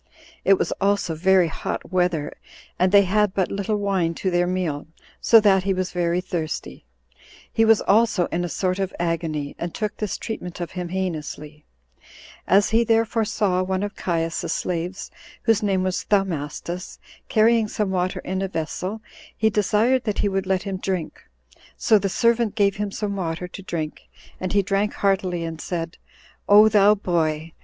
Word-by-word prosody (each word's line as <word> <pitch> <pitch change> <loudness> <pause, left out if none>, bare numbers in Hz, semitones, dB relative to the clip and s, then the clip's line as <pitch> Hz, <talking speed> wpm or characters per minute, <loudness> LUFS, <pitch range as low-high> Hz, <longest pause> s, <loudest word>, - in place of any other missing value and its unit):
It 195 0 +5
was - - -1
also 200 -3 +1
very 185 +2 +3
hot 160 - -5
weather, 175 -5 0 0.5
and 185 0 +3
they 200 0 +7
had 205 +1 +1
but 190 -2 0
little 200 +2 -1
wine 190 -5 0
to 185 - -2
their 175 0 +2
meal, 175 -6 -2 0.3
so 225 - +6
that 200 -3 +4
he 195 0 0
was 185 0 -2
very 175 0 0
thirsty; 170 -4 -5 0.7
he 225 - +3
was 225 -1 +5
also 210 -3 +3
in 175 +1 -1
a 175 - -3
sort 185 +2 -1
of 195 -1 -1
agony, 165 -4 -2
and 170 -1 -4
took 215 -2 -3
this 210 -3 -3
treatment 180 -6 -6
of 175 - -4
him 180 -2 -5
heinously: 155 -4 -5 0.8
as 200 +3 +4
he 225 +1 +4
therefore 225 0 +1
saw 200 -4 0
one 190 +1 -1
of 205 0 -4
Caius's 165 -2 -2
slaves, 180 +2 -3 0.3
whose 225 -1 +3
name 195 -3 +1
was 185 0 -1
Thaumastus, 180 -2 -2 0.3
carrying 225 0 +4
some 210 -2 -2
water 185 -1 -1
in 185 +1 -3
a 195 - -1
vessel, 185 +5 -4 0.3
he 220 0 +2
desired 215 +5 +2
that 210 -2 -1
he - - +1
would 195 -1 -2
let 190 -1 +1
him 195 -2 -3
drink; 185 -4 -4 0.6
so 215 - +4
the 195 0 -1
servant 230 +2 +1
gave 200 -2 +2
him 205 0 -2
some 200 0 -3
water 175 -1 -3
to 185 - -10
drink, 160 -5 -5 0.3
and 185 0 -3
he 200 -1 +3
drank 195 +2 0
heartily, 185 -3 0
and 165 -1 -5
said, 165 -1 -4 0.5
"O 210 +2 +8
thou 210 0 +5
boy! 165 -4 -1
190 Hz, 175 wpm, -23 LUFS, 175-205 Hz, 0.8 s, O